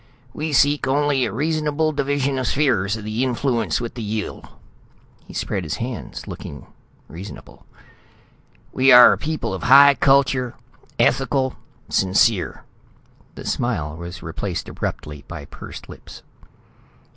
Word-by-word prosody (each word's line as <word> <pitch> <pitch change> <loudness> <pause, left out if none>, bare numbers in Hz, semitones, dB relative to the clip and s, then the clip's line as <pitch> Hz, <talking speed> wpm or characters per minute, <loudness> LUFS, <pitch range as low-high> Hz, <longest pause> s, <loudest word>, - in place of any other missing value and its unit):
"We 155 +1 -3
seek 145 +1 +3
only 140 -1 +2
a 110 - -3
reasonable 155 +4 0
division 140 -2 -1
of 130 - -2
spheres 110 -8 +1
of 105 - -9
influence 115 - 0
with 120 -1 -5
the 120 - -7
Yill." 105 0 -4 0.8
He - - -11
spread 95 - -2
his 75 -3 -3
hands, 120 0 -6
looking - - -9 0.4
reasonable. 95 +5 -11 1.1
"We 135 +1 +4
are 125 0 +9
a - - -3
people 155 -9 -3
of 95 - -5
high 140 +3 +8
culture, 135 -3 +2 0.4
ethical, 135 0 +1 0.3
sincere." 95 +1 +1 0.7
The - - -9
smile 75 0 -2
was 85 +1 -8
replaced 85 +1 -4
abruptly 75 -1 -5
by 85 -4 -8
pursed - - -10
lips. - - -12
125 Hz, 125 wpm, -21 LUFS, 100-140 Hz, 1.1 s, are